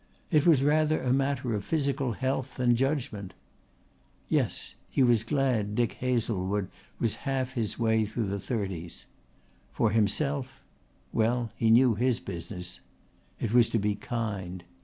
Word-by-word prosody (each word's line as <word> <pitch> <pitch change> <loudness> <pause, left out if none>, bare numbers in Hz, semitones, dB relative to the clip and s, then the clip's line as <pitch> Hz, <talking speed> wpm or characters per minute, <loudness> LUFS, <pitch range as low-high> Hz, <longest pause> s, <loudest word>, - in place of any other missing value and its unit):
It 155 0 +4
was 150 -6 +6
rather 155 +1 +3
a 125 -1 +2
matter 135 -3 0
of 105 -1 -2
physical 140 -4 0
health 130 +1 -2
than 125 -2 +3
judgment. 115 - -2 0.9
Yes, - - 0 0.2
he 135 - +2
was 120 -3 +4
glad 120 -6 0
Dick 120 -1 +2
Hazlewood 105 -6 0 0.3
was 115 - 0
half 130 -1 -1
his 115 -5 -2
way 110 -2 +2
through 110 +2 -2
the 100 +1 -2
thirties. 95 -6 -4 0.7
For 110 - +1
himself 130 +5 0 0.5
well, 115 +1 +1
he 115 - +1
knew 120 +1 +6
his 120 +2 +1
business. 90 0 -6 0.6
It 110 -1 -2
was 120 -2 +5
to - - +1
be 105 0 +1
kind. 100 -5 -4
115 Hz, 140 wpm, -28 LUFS, 105-130 Hz, 0.9 s, was